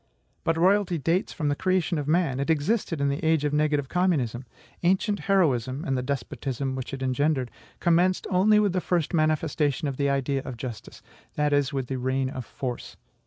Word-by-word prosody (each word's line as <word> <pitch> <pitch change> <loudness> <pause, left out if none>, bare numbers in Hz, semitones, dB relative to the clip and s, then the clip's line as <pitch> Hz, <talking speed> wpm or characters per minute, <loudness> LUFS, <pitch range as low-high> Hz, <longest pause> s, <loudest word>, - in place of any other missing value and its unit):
But 165 0 +1
royalty 185 0 +3
dates 165 +6 0
from 150 -2 -2
the 145 - +1
creation 185 -1 0
of 145 - -4
man; 155 -5 +1
it 140 - -2
existed 165 +2 0
in 140 0 +1
the 140 +3 -3
age 160 -2 +2
of 145 - 0
negative 150 -2 +1
communism. 135 -9 0 0.4
Ancient 190 +4 +1
heroism 140 -7 +2
(and 135 - 0
the 125 - 0
despotism 135 0 -3
which 130 -1 -5
it 135 -1 -5
engendered) 130 -1 0 0.3
commenced 175 +2 +2
only 205 +4 +5
with 205 -3 +2
the 185 - 0
first 175 -2 -1
manifestation 155 -2 +1
of 135 -2 -4
the 140 -1 +1
idea 140 0 0
of 125 - -7
justice; 120 -2 -8 0.3
that 150 -1 +1
is, 145 -2 +2
with 135 -2 -2
the 130 +1 -4
reign 130 +1 -1
of 130 -3 -6
force. 125 -3 -6
145 Hz, 190 wpm, -26 LUFS, 135-170 Hz, 0.4 s, only